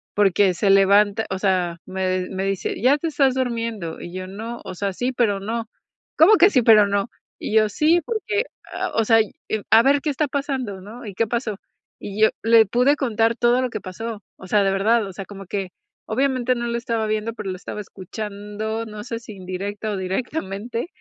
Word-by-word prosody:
porque 200 -1 +4
se 195 +3 0
levanta 200 +2 +4
o 190 - -2
sea, 185 -3 +1
me 185 -1 -1
me 190 0 -3
dice: 195 -1 -2
"Ya 265 +4 +4
te 330 - -3
estás 275 -4 +2
durmiendo" 230 -9 -3
y 175 - -8
yo: 185 0 -5
"No, 225 +5 -7
o - - -7
sea, 200 +1 -2
sí, 245 +7 -1
pero 225 -6 +1
no". 225 +3 -3 0.5
"¿Cómo 360 +8 +7
que 385 +3 +7
sí, 260 -10 +3
pero 215 -2 +7
no?" 200 +1 0 0.3
Y - - -4
yo: 215 -1 +5
"Sí, 315 +10 +3
porque, 445 0 -1 0.3
a - - -2
o 225 - +2
sea, 225 0 +5 0.5
a 225 +1 +7
ver 280 +2 +3
qué 305 - -1
está 295 +1 0
pasando", 265 -8 -3
¿no? 225 +5 -10
"¿Y 205 - -7
qué 225 +4 0
pasó?" 230 -2 -2 0.4
Y 205 +1 -7
yo, 220 - +7
le 225 0 +6
pude 250 +7 +3
contar 230 -4 +1
todo 240 +2 +3
lo 255 - -1
que - - -5
pasó. 210 +3 -6
O 190 - -11
sea, 205 +2 +3
de 195 - +2
verdad. 215 +3 +2
O 195 - -8
sea, 195 +1 -7
como 195 0 -10
que 195 0 -3 0.4
obviamente 255 +1 +1
no 240 0 -3
lo 235 0 -1
estaba 230 -2 -2
viendo, 215 +1 -1
pero 210 -3 -6
lo - - -4
estaba 190 +3 -7
escuchando. 210 +3 -5
No 210 -1 -8
sé, 230 -1 -5
si 230 -2 -11
indirecta 195 +3 -5
o 205 - -2
directamente, 205 - -3
220 Hz, 210 wpm, -22 LUFS, 195-240 Hz, 0.5 s, Cómo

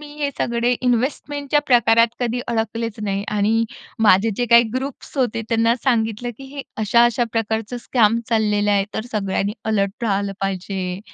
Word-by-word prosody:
मी 295 -1 -11
हे 285 -1 0
सगळे 235 +1 +1
इन्व्हेस्टमेंटच्या 280 +4 0
प्रकारात 230 -2 +4
कधी 245 0 -1
अडकलेच 230 -1 -2
नाही 200 -1 -2
आणि 225 +3 +2 0.4
माझे 195 +5 +5
जे 245 - 0
काही 235 0 +8
ग्रुप्स 270 +2 -5
होते, 230 -3 0
त्यांना 230 0 +3
सांगितलं 230 -1 0
की 270 - -10
हे 280 - -5
अशा-अशा 235 +2 +3
प्रकारचं 225 +1 -2
स्कॅम 230 -2 +2
चाललेलं 210 -2 +1
आहे. 200 -1 +3
तर 220 - -3
सगळ्यांनी 200 -1 -1
अलर्ट 200 0 -1
राहायला 200 -2 0
पाहिजे. 190 -1 -3
225 Hz, 150 wpm, -21 LUFS, 205-240 Hz, 0.4 s, काही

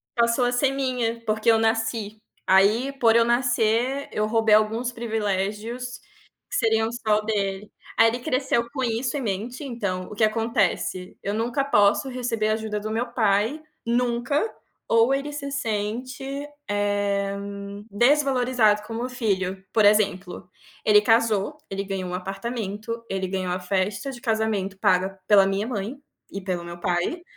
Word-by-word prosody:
passou 235 +1 +2
a 245 - +1
ser 265 +2 +2
minha, 250 -4 -1
porque 215 +1 +1
eu 225 - +6
nasci. 225 -1 0 0.3
Aí, 210 +8 +4
por 230 -1 +5
eu 230 - +6
nascer, 240 +2 +1
eu 210 - 0
roubei 225 -1 +4
alguns 225 +3 +1
privilégios 225 +2 -3 0.5
que - - -4
seriam 225 0 +2
só 215 -3 +1
dele. 205 -1 -2 0.3
Aí 225 - +7
ele 235 +2 0
cresceu 250 -1 0
com 265 - -2
isso 240 +3 -1
em - - -3
mente 230 +6 -3
então, 200 -8 -3
o 210 - -7
que 220 - +1
acontece. 215 -4 0
Eu 200 - -2
nunca 235 +5 0
posso 235 +1 +3
receber 240 -4 -1
ajuda 215 -1 -1
do 215 +1 -5
meu 235 +3 -1
pai, 220 +6 +1 0.2
nunca, 245 - 0 0.3
ou 230 +4 +4
ele 280 +2 -2
se 280 -1 -5
sente, 255 +3 -3 0.2
eh, 205 -1 0 0.6
desvalorizado 250 -3 +3
como 230 +3 -4
filho. 195 -6 -2
Por 215 -2 +4
exemplo, 195 -3 +1 0.3
ele 210 -1 +6
casou, 225 +3 +2
ele 195 0 -3
ganhou 190 -2 -4
um - - -5
apartamento, 210 +3 -4
ele 190 -1 -2
ganhou 185 -1 -2
a 185 - -2
festa 190 +6 -1
de 250 - -9
casamento 220 -4 -1
paga 190 +1 +2
pela 200 -2 +7
minha 195 +2 -1
mãe, 225 +1 -3 0.4
e 195 - -4
pelo 185 -3 -3
meu 170 0 -8
pai, 180 - -1
220 Hz, 150 wpm, -24 LUFS, 200-245 Hz, 0.6 s, Aí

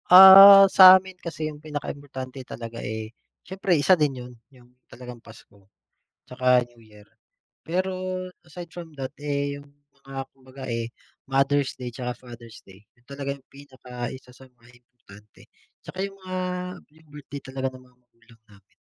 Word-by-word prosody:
Ah, 195 +2 +10
sa 185 0 +9
amin 190 0 -9
kasi 165 -2 -6
yung 150 0 -14
pinakaimportante 140 -3 -7
talaga, 115 0 -8
eh, 110 +1 -6 0.3
siyempre 185 -1 -1
isa 150 +6 +4
din 150 -5 +1
yun, 125 0 -12 0.2
yung 125 -3 -22 0.2
talagang 125 -1 -12
Pasko, 100 -3 -19 0.6
tsaka 125 -1 +2
New 120 -1 -22
Year. 105 -1 -19 0.6
Pero 185 +3 -2 0.5
aside 170 +1 -11
from 170 -2 -11
that, 135 -2 -6
eh, 140 -1 -3
yung 145 - -15 0.4
mga 135 0 -6
kumbaga, 130 0 -15
eh, 115 0 -4 0.3
Mother's 135 +1 0
Day, 125 -1 -7
tsaka 125 +1 -6
Father's 120 -2 -14
Day, 95 +2 -19
yun 120 -1 -33
talaga 140 0 -5
yung 135 -1 -20
pinaka 130 -3 -9
isa 130 -1 -14
sa 130 +1 -17
mga 120 -2 -24
importante. 105 -4 -20 0.3
Tsaka 185 - -12
yung 195 0 -13
mga 185 0 -5 0.6
yung 160 0 -24
birthday 145 -1 -10
talaga 130 0 -5
ng 130 - -14
mga 125 -1 -25
magulang 115 -2 -25
namin. 100 -2 -24
130 Hz, 160 wpm, -24 LUFS, 120-150 Hz, 0.6 s, Ah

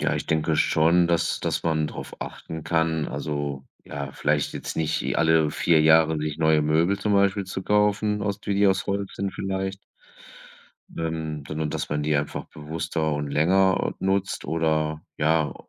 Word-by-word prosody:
Ja, - - +1
ich - - -4
denke 80 0 +1
schon, 85 +2 +3
dass 85 -2 +1
dass - - -1
man 80 -2 +1
drauf - - -8
achten 80 -1 -7
kann. 80 -2 0
Also, 70 -1 -4 0.2
ja, 70 -1 -6
vielleicht 75 0 0
jetzt - - -5
nicht 80 0 0
e - - -2
alle 80 -2 +3
4 80 0 +3
Jahre 80 0 +5
sich 75 0 -3
neue 80 -1 +3
Möbel 80 +6 +2
zum 105 +1 0
Beispiel 100 0 +2
zu 95 0 -5
kaufen 105 +1 +1
aus 100 0 -2
die 100 - -2
die 100 +1 +4
aus 95 -1 +1
Holz 100 0 -2
sind 100 -1 -3
vielleicht 95 0 -3 1.1
dann 80 -3 -4
sondern 75 0 -3
dass - - -3
man 75 0 -1
die 75 0 +1
einfach 70 0 -3
bewusster 80 +1 -3
und 75 0 -3
länger, 95 +6 +2
äh, - - -4
nutzt 95 0 0
oder, 80 -1 0 0.2
ja, 80 0 +2
80 Hz, 175 wpm, -25 LUFS, 75-95 Hz, 1.1 s, Jahre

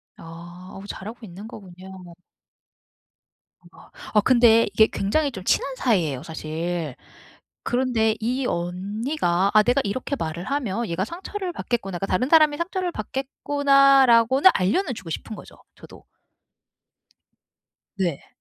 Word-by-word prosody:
아. 175 +2 -12
어 - - -11
잘하고 220 +4 -8
있는 200 +4 -10
거군요. 185 -4 -12 1.6
아 - - -18 0.2
어 210 - +5
근데 235 -1 +5
이게 220 0 +5
굉장히 280 +9 -1
좀 190 -6 -8
친한 265 +6 0
사이에요 170 - 0
사실. 160 -2 -4 0.7
그런데 240 -3 +1
이 250 +4 -2
언니가 190 - -1
'아 215 - +6
내가 245 +5 +2
이렇게 255 +7 -3
말을 165 0 -5
하면 235 -5 -2
얘가 170 +3 -2
상처를 370 - -6
받겠구나.' 195 - -3
그러니까 195 - -3
'다른 250 +9 0
사람이 305 -2 +5
상처를 360 +1 -3
받겠구나.'라고는 275 - +3
알려는 255 - 0
주고싶은 175 +4 -7
거죠 - - -13 0.2
저도. - - -15 1.9
네. 175 -7 -2
220 Hz, 275 characters per minute, -23 LUFS, 180-265 Hz, 1.9 s, 아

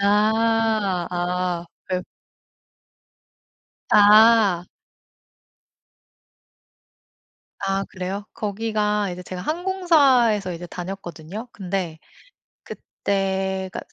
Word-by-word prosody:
아 215 -2 +2
아. 180 0 -2 0.2
그래요. 185 -1 -2 1.9
아. 210 -3 +6 2.9
아 195 0 -1
그래요? 190 +2 -5
거기가 210 -1 -1
이제 180 +1 -7
제가 180 0 -7
항공사에서 290 - +2
이제 175 +1 -7
다녔거든요. 180 +3 -7
근데 180 -4 -4 0.7
그때가 190 -1 -3
195 Hz, 145 characters per minute, -23 LUFS, 180-220 Hz, 2.9 s, 아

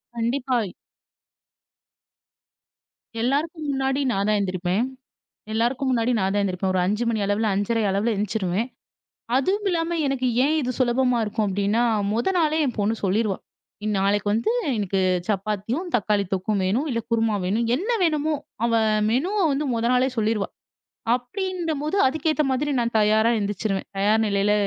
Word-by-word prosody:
கண்டிப்பாய். 235 -3 -1 2.5
எல்லாருக்கும் 300 +5 -1
முன்னாடி 270 0 0
நான் 200 -1 0
தான் 210 - +3
எந்திரிப்பேன். 185 +3 0 0.7
எல்லாருக்கும் 245 +4 0
முன்னாடி 240 0 +1
நான் 190 0 +1
தான் 205 - +2
எந்திரிப்பேன் 185 0 -1
ஒரு 185 - +2
5:00 210 +5 0
மணி 220 -2 0
அளவில் 205 +2 +1
5:30 215 +3 0
அளவுல 200 +4 +1
எழுந்திச்சிடுவேன். 200 +1 -1 0.7
அதுவும் 390 +9 +1
இல்லாம 335 -1 0
எனக்கு 270 -2 0 0.2
ஏன் 305 +3 +2
இது 255 0 -1
சுலபமா 250 0 +2
இருக்கும். 215 0 -1
அப்படினா 200 +4 +1 0.3
முதல் 245 - 0
நாளே 315 -1 +2
என் 250 - -2
பொண்ணு 215 +3 +1
சொல்லிருவா. 200 +1 +1 0.5
இனி 215 - 0
நாளைக்கு 200 +1 +1
வந்து 225 - +1 0.3
"எனக்கு 195 -2 -1 0.3
சப்பாத்தியும், 215 - -2
தக்காளி 210 -2 +1
தொக்கும் 195 +2 0
வேணும். 230 +12 0
இல்ல 230 -3 0
குருமா 225 -2 +2
வேணும்." 220 +5 0
என்ன 380 - -3
வேணுமோ, 310 -1 +1 0.3
அவ 235 - +2 0.4
மெனுவ 340 - 0
வந்து 285 +2 -1
முதல் 235 +2 +1
நாளே 255 +1 +3
சொல்லிருவா. 215 -2 +1 0.7
அப்படின்னும்போது, 325 +3 -3
அதுக்கேத்த 310 +1 0
மாதிரி 290 +3 0
நான் 235 -1 -1
தயாரா 215 +2 +4
எந்திரிச்சிருவேன். 200 -1 -2
தயார் 215 +3 +3
நிலையில. 200 0 +2
230 Hz, 140 wpm, -24 LUFS, 205-270 Hz, 2.5 s, தயாரா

